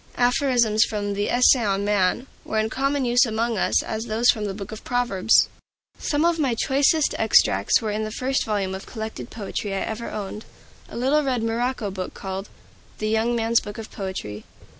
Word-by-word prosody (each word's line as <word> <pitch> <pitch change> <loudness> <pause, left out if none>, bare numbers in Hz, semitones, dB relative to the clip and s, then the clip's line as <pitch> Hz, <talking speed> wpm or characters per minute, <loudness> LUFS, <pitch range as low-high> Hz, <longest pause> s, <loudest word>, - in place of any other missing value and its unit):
Aphorisms 245 -3 +3
from 205 -1 -2
the 205 +1 -1
"Essay 250 0 +5
on 200 -1 0
Man" 205 +3 +1 0.2
were 220 - -3
in 215 - +2
as 220 - -5
common 275 0 0
use 245 +1 +4
among 225 -2 -1
us - - +2
as 220 +1 -4
those 230 +2 +3
from 215 -2 -4
the 200 - -3
Book 200 0 -7
of 220 - -8
Proverbs. 240 -4 +2 0.5
Some 295 +2 0
of 340 -1 +2
my 265 -6 +1
choicest 280 +5 +2
extracts - - +3
were 215 - -1
in 215 +1 -2
the 215 - -3
first 255 +4 -1
volume 200 -3 -2
of 190 +1 -7
collected 220 - -6
poetry 205 -2 -4
I 195 - -2
ever 225 +1 -4
owned, 210 0 -6 0.5
a - - -8
little 270 +5 +2
red 255 -5 -1
morocco 230 -1 -1
book 185 -1 -6
called 195 +1 -6 0.5
"The 215 - -2
Young 225 +2 +1
Man's 230 0 +2
Book 205 +3 -9
of 225 -1 -8
Poetry." 185 - -6
220 Hz, 195 wpm, -23 LUFS, 205-245 Hz, 0.5 s, Essay